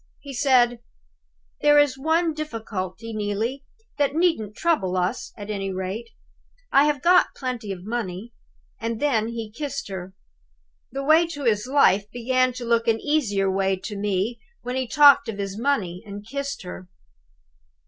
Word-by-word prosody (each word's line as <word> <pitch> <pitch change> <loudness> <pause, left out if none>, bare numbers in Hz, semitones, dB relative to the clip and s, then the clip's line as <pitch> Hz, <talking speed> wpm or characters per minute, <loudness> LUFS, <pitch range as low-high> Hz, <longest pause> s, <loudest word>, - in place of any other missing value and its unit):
He 280 -1 -9
said: 245 -3 +3 0.8
'There 295 0 +5
is 290 -3 +4
one 320 +4 +1
difficulty, 225 - -5
Neelie, 215 +6 -2 0.4
that 285 0 +1
needn't 320 - +1
trouble 235 - +1
us, 180 +7 -1
at 205 0 -6
any 195 -2 -3
rate. 190 +5 -4 0.6
I 275 +1 +6
have 295 -2 0
got 360 +1 +4
plenty 250 -6 -4
of 180 -2 -7
money.' 220 -1 -4 0.5
And 230 0 -3
then 235 -6 +1
he 230 -2 -5
kissed 280 -5 -4
her. 190 -1 -7 0.8
The 275 +2 -4
way 315 +4 +5
to 290 -4 -7
his 220 -2 +1
life 210 -7 +3
began 255 +2 +1
to 245 0 -6
look 230 0 +1
an 225 -1 +3
easier 205 -11 +1
way 195 0 +1
to 205 +3 -7
me 205 +3 -1 0.2
when 250 +1 -3
he 260 -1 -1
talked 285 -2 +6
of 210 - -5
his 200 0 -4
money, 195 -10 0
and 205 0 -9
kissed 280 -1 -4
her. 180 0 -9
230 Hz, 160 wpm, -24 LUFS, 200-280 Hz, 0.8 s, I